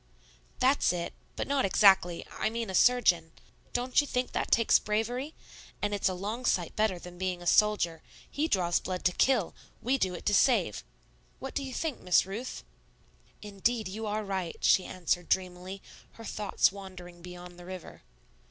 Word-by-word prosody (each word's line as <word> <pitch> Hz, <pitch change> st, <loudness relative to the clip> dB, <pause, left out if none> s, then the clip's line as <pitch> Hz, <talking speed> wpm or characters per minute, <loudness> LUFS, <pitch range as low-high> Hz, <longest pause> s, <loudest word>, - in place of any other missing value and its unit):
"That's 265 Hz, +3 st, +3 dB
it 175 Hz, -1 st, -4 dB, 0.2 s
but -, -, -3 dB
not 280 Hz, -1 st, +1 dB
exactly 190 Hz, -3 st, +4 dB
I -, -, -1 dB
mean 230 Hz, -2 st, -4 dB
a -, -, -7 dB
surgeon. 180 Hz, -8 st, +3 dB, 0.4 s
Don't 250 Hz, +3 st, +2 dB
you 290 Hz, -, -6 dB
think 250 Hz, -1 st, -1 dB
that -, -, -2 dB
takes 230 Hz, -1 st, +4 dB
bravery? 240 Hz, +8 st, -2 dB, 0.4 s
And 205 Hz, 0 st, -1 dB
it's 200 Hz, -1 st, +1 dB
a 185 Hz, -, -3 dB
long 210 Hz, +7 st, -4 dB
sight 180 Hz, -8 st, 0 dB
better 215 Hz, -4 st, +1 dB
than 175 Hz, 0 st, -11 dB
being 185 Hz, -1 st, -2 dB
a 175 Hz, -, -11 dB
soldier; 175 Hz, -5 st, +3 dB, 0.3 s
he 300 Hz, +2 st, -1 dB
draws 175 Hz, -, +2 dB
blood 185 Hz, -1 st, -5 dB
to 180 Hz, -, +5 dB
kill, 235 Hz, -2 st, +2 dB, 0.3 s
we 265 Hz, +3 st, 0 dB
do 185 Hz, -4 st, 0 dB
it -, -, -9 dB
to 205 Hz, -, +2 dB
save. 205 Hz, -, +3 dB, 0.5 s
What 265 Hz, 0 st, -7 dB
do -, -, -1 dB
you 265 Hz, -, -6 dB
think, 305 Hz, +1 st, -3 dB
Miss 180 Hz, -1 st, +4 dB
Ruth?" 215 Hz, +7 st, -6 dB, 0.8 s
"Indeed, 210 Hz, +2 st, -1 dB
you 215 Hz, +3 st, -5 dB
are 215 Hz, +1 st, -1 dB
right," 190 Hz, -4 st, -3 dB
she 185 Hz, -, +4 dB
answered 175 Hz, -1 st, -2 dB
dreamily, 185 Hz, +1 st, -2 dB, 0.3 s
her 225 Hz, -, -11 dB
thoughts 210 Hz, -2 st, +1 dB
wandering 185 Hz, -3 st, -11 dB
beyond 180 Hz, 0 st, -10 dB
the 175 Hz, -, -11 dB
river. 185 Hz, -1 st, -9 dB
195 Hz, 175 wpm, -29 LUFS, 180-230 Hz, 0.8 s, to